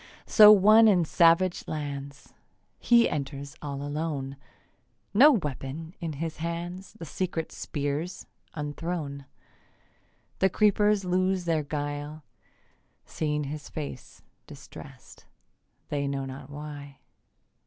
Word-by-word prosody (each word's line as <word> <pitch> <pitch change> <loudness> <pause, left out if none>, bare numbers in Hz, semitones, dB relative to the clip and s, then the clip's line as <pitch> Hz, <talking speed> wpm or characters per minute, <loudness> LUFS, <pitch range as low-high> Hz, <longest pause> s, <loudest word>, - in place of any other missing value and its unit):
So 210 -1 +8
one 215 +2 +7
in 180 -5 +4
savage 170 +3 +3
lands: 140 -2 -6 0.5
He 235 -1 +5
enters 140 0 -5
all 140 -1 -5
alone; 145 -2 -3 0.8
No 280 +8 +7
weapon 155 - -4
in 165 -2 -3
his 160 +2 -5
hands. 170 +3 -5
The 200 -7 -9
secret 165 -1 -3
spears 145 +4 -4 0.3
unthrown, 150 -1 -4 1.1
The 190 - +4
creepers 210 0 +2
lose 185 0 0
their 165 -2 +1
guile, 145 +1 -5 0.8
Seeing 150 -1 -2
his 145 +1 -7
face, 145 -5 -8 0.2
distrest - - -13 0.6
They 140 -2 -1
know 140 -1 -3
not 135 +1 -9
why. 145 -1 -9
155 Hz, 105 wpm, -27 LUFS, 145-180 Hz, 1.1 s, So